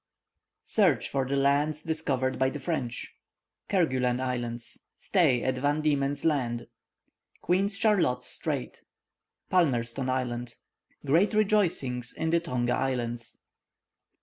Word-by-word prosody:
Search 190 -9 +3
for 135 -2 -1
the 140 - -1
lands 145 +2 +1
discovered 135 -5 -1
by 130 0 +3
the 140 - -5
French 135 -5 -3 0.6
Kerguelen 130 -10 +1
Islands 120 -2 -4 0.2
Stay 150 - +2
at 130 -1 0
Van 145 +3 +1
Diemen's 145 -1 0
Land 125 -7 0 0.8
Queen 190 +3 +2
Charlotte's 200 - +1
Strait 60 - -2 0.7
Palmerston 130 -7 +1
Island 120 -2 -2 0.5
Grand 170 +10 +3
rejoicings 170 - +1
in 160 0 -2
the 170 - +4
Tonga 125 -7 -1
Islands. 120 -3 -3
135 Hz, 110 wpm, -28 LUFS, 125-160 Hz, 0.8 s, the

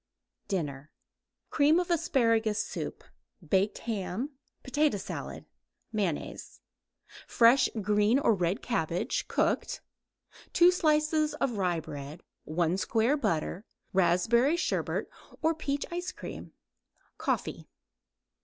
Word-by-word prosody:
DINNER 150 -6 -3 0.6
Cream 305 +3 +4
of 360 0 -2
asparagus 230 -9 +2
soup; - - -6 0.4
baked 190 +6 +2
ham; 225 +4 -3 0.3
potato 290 -2 +1
salad; 190 - -6 0.5
mayonnaise; 195 -8 -3 0.7
fresh 245 +2 +5
green 210 +4 +3
or 275 -5 +3
red 180 +2 -1
cabbage, 170 -7 -1
cooked; - - 0 0.7
2 350 +1 +7
slices 305 -2 +2
rye 190 -9 0
bread; 145 +2 -8 0.2
1 170 +2 0
square 225 +7 +2
butter; 170 - -1 0.3
raspberry 195 - +3
sherbet - - -1 0.4
or 320 +1 +4
peach 285 -3 -2
ice 355 +1 -3
cream. - - -8 0.7
Coffee. - - -2
220 Hz, 100 wpm, -29 LUFS, 180-290 Hz, 0.7 s, 2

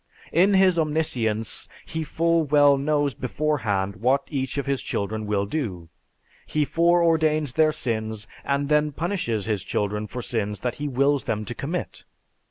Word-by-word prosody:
In 190 +5 +4
his 185 -3 +4
omniscience 125 -9 -1 0.2
he 160 0 -3
full 165 +2 +1
well 145 -1 +5
knows 145 0 +1
beforehand 110 -7 -1
what 130 +5 +2
each 135 -2 -2
of 140 - -1
his 140 -2 -1
children 105 +1 -3
will 100 -1 +1
do. 100 - -4 0.6
He 150 -1 +1
foreordains 160 -4 +2
their 155 +1 +4
sins 110 -7 -2 0.2
and 140 0 0
then 150 0 +2
punishes 160 - -2
his 105 -4 -1
children 105 +2 -2
for 125 +3 -6
sins 105 -3 -2
that 125 - -2
he 150 - -1
wills 140 +1 +1
them 105 0 -2
to 120 - -5
commit. 165 +8 -5
140 Hz, 155 wpm, -24 LUFS, 110-155 Hz, 0.6 s, well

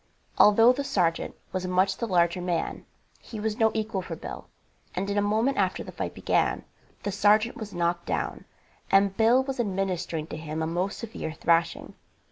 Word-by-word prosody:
Although 225 +4 +7
the 280 +2 -3
sergeant 175 -10 0 0.2
was 185 -1 -3
much 185 +1 +2
the 235 - -2
larger 175 -2 +2
man, 175 -2 -2 0.3
he 220 - -9
was 220 +2 -2
no 225 -1 +5
equal 215 -3 -1
for 175 -2 -6
Bill, - - -8 0.5
and 190 +2 -2
in - - -1
a - - +2
moment 220 +6 +1
after 185 -2 0
the - - -9
fight - - -5
began - - 0 0.4
the 205 - -2
sergeant 210 +3 +3
was 215 -2 -7
knocked 170 0 -1
down, - - -2 0.4
and 195 0 +4
Bill 235 +4 +4
was 265 -1 -5
administering 190 -6 -2
to - - -4
him 160 0 -4
a - - 0
most 180 +5 -2
severe 220 -8 -6
thrashing. 165 +1 +1
195 Hz, 180 wpm, -27 LUFS, 175-220 Hz, 0.5 s, Although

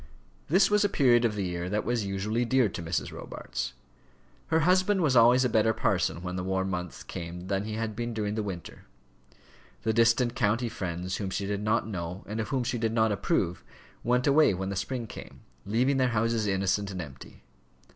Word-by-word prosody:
This 190 +5 +4
was 210 0 +4
a 205 - +2
period 125 -8 +4
of 110 -2 0
the 100 - -1
year 90 0 -3
that 105 +2 -1
was 120 0 0
usually 100 +4 -1
dear 130 0 +3
to 85 - -6
Mrs. 80 -1 -2
Robarts. 65 +1 -5 0.7
Her 160 0 +2
husband 185 +4 +3
was 145 -6 +2
always 120 +2 +6
a - - +4
better 110 -1 +3
parson 95 -5 0
when 90 0 -4
the 90 - -2
warm 95 +1 -1
months 90 -2 -5
came 85 +1 -7
than 100 0 0
he 110 - -4
had 110 -1 -3
been 120 +2 -3
during 105 -2 -2
the 110 - -1
winter. 95 -4 -7 1.0
The 110 - +1
distant 115 +2 +3
county 120 0 +1
friends 90 -2 -4
whom 100 -3 -3
she 100 +1 -2
did 100 0 -2
not 105 +1 +1
know 90 -2 -5
and 110 +2 -5
of 110 - -2
whom 130 -2 0
she 120 0 -2
did 110 -1 0
not 110 -1 +3
approve 90 -3 0 0.4
went 125 +1 +2
away 145 -7 +5
when 95 +1 -3
the 100 - -3
spring 120 +4 -3
came, - - -10 0.3
leaving 125 +6 +2
their 130 -1 +3
houses 115 -1 +1
innocent 95 +1 0
and 95 -2 -5
empty. 70 -6 -10
110 Hz, 205 wpm, -28 LUFS, 95-120 Hz, 1.0 s, always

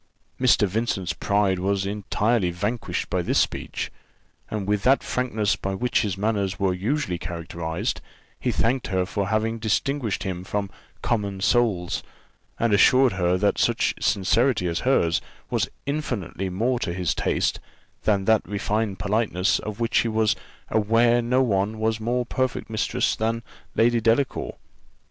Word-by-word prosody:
Mr. 125 -5 +4
Vincent's 95 -3 -1
pride 100 -2 +1
was 95 +1 0
entirely 105 0 0
vanquished 100 +7 -2
by - - +1
this - - 0
speech; - - -1 0.6
and 105 -2 -3
with 105 -1 +1
that 135 +5 +4
frankness 110 -5 0
by 95 0 -3
which 125 +5 +1
his 100 -4 -2
manners 100 -2 -1
were 95 -2 +2
usually 95 - -1
characterized, 85 -1 -4 0.4
he - - 0
thanked 125 +3 0
her 95 -3 0
for 100 0 -2
having 110 +2 0
distinguished 110 +1 0
him 90 -2 -4
from 100 +1 -3 0.3
common 100 -4 -1
souls; 105 -5 +1 0.6
and 115 -2 +2
assured 130 +5 +6
her 90 -1 +1
that 100 +2 +1
such - - +2
sincerity 105 +2 +2
as 85 -1 -1
hers 90 -11 +2 0.3
was - - 0 0.2
infinitely 120 - -3
more 120 +7 0
to 85 -7 -2
his 90 -3 0
taste - - 0 0.4
than 100 -3 +1
that 110 0 +4
refined 105 0 -1
politeness 100 -1 +1
of 105 0 -6
which 115 0 +2
he - - +1
was 110 -1 +2 0.4
aware 115 +3 +3
no 125 +3 +2
one 105 -1 0
was 110 0 0
more 120 +3 0
perfect 130 -2 -2
mistress 110 - 0
than 115 +1 -1 0.3
Lady 115 +1 +3
Delacour. 115 +5 +1
105 Hz, 150 wpm, -24 LUFS, 95-115 Hz, 0.6 s, assured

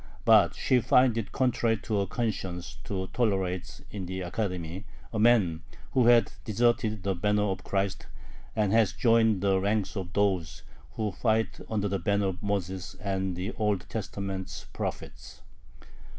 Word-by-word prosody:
But 105 -7 +6
she 130 -2 +2
finds 125 0 +4
it 110 - -5
contrary 120 -3 +1
to 105 -2 0
her 100 - +1
conscience 95 -6 -3
to 95 -2 -3
tolerate 95 -7 -1
in 95 -3 -5
the 95 +1 -4
Academy 90 -1 -3 0.3
a 110 - -1
man 105 -8 +4 0.3
who 125 -3 +3
has 120 -1 +7 0.2
deserted 110 -1 +1
the 100 -1 +1
banner 105 +3 +1
of 95 -2 -2
Christ, 95 -1 -2 0.5
and 105 -3 +1
has 110 -3 +4
joined 110 -1 +3
the 95 -1 +3
ranks 100 0 0
of 90 -3 -5
those 90 -7 0 0.3
who 110 -2 -2
fight 110 +3 0
under 105 -2 0
the 100 -1 -1
banner 100 +2 +1
of 95 +1 -6
Moses 95 -3 -3
and 95 -2 -2
the 90 +5 -3
Old 105 -5 -1
Testament 100 -3 -5
prophets." - - -6
100 Hz, 150 wpm, -28 LUFS, 95-110 Hz, 0.5 s, has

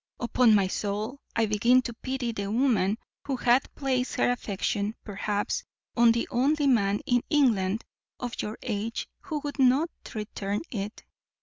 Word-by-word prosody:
Upon 235 -1 +4
my 200 -2 +4
soul, 210 +7 -3 0.2
I 230 - +3
begin 235 +5 +4
to 240 - -4
pity 255 0 -3
the 200 -2 -4
woman, 220 -5 +2 0.3
who 275 - 0
hath 245 +1 +2
placed 260 -3 -1
her - - +3
affection, 205 -2 -2
perhaps, 205 0 -2 0.3
on 235 -1 +6
the 235 0 0
only 285 +4 +2
man 205 -6 +3
in 245 -1 +3
England 225 -8 +2 0.4
of 245 -1 -4
your 215 +2 -5
age 225 0 -3
who 310 -5 -4
would 290 0 -5
not 270 +6 +4 0.2
return 205 -1 -3
it. 210 -1 -5
235 Hz, 150 wpm, -27 LUFS, 205-255 Hz, 0.4 s, on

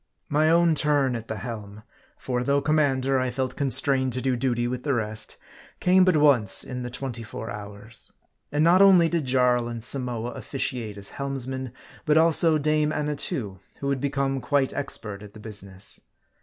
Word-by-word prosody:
My 155 +2 +3
own 170 0 +4
turn 145 -4 +2
at 115 -1 -6
the 110 - -4
helm 105 -2 -7 0.3
for 125 -1 -2
though 140 +2 +2
commander, 135 -3 +1
I 130 0 0
felt 130 +1 -3
constrained 135 -1 +2
to 125 - -1
do 130 -1 +1
duty 120 -1 0
with 125 0 -3
the 140 -1 0
rest 110 -2 -2 0.4
came 185 0 +5
but 185 -4 +3
once 135 -9 +4
in 125 -1 -6
the 125 - -4
twenty 125 -1 -5
four 110 0 -7
hours. 105 +2 -4 0.4
And 145 +1 +2
not 175 +3 +5
only 185 -4 +6
did 165 -4 -1
Jarl 125 -2 +2
and 115 -2 -6
Samoa, 125 -2 -1
officiate 120 -7 -4
as 100 0 -7
helmsmen, 130 -2 -3 0.4
but 150 +1 +4
also 160 0 +4
Dame 150 0 +1
Annatoo, 140 -10 -2 0.2
who 140 0 -1
had 135 -2 -1
become 135 -1 -1
quite 140 -1 +1
expert 105 -8 -4
at 105 0 -12
the - - -10
business. 100 -3 -5
130 Hz, 175 wpm, -25 LUFS, 115-145 Hz, 0.4 s, only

